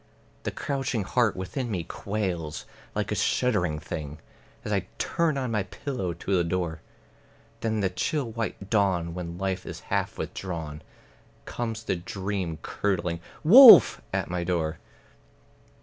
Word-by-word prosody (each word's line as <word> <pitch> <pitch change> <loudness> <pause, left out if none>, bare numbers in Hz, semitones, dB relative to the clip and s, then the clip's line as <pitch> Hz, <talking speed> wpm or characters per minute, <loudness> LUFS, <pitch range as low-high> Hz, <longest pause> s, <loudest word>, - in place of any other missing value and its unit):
The - - -2
crouching 135 -6 -2
heart 115 +2 +1
within 120 +7 -4
me 90 -6 -2
quails 90 -5 -4 0.3
like - - -2
a - - +2
shuddering 90 -11 +1
thing, 75 -1 -6 0.5
As 105 - -2
I 95 -2 -1
turn 165 -4 0
on 130 -3 -2
my 105 -2 +1
pillow 100 -1 -4
to 95 +4 -2
the 90 - +3
door; 85 -2 -2 0.8
Then 110 -1 -1
in 110 - 0
the 95 - +1
chill 120 - -1
white 110 -3 -4
dawn, 95 -6 +1
when 85 -1 -6
life 95 0 -2
is - - -8
half - - -1
withdrawn, 80 -5 -5 0.6
Comes 115 -2 -4
the 95 - -1
dream 95 -2 -4
curdling 90 -4 -1 0.2
"Wolf!" 235 - +10
at - - -1
my 90 0 -2
door. 85 -3 -1
95 Hz, 145 wpm, -27 LUFS, 85-115 Hz, 0.8 s, Wolf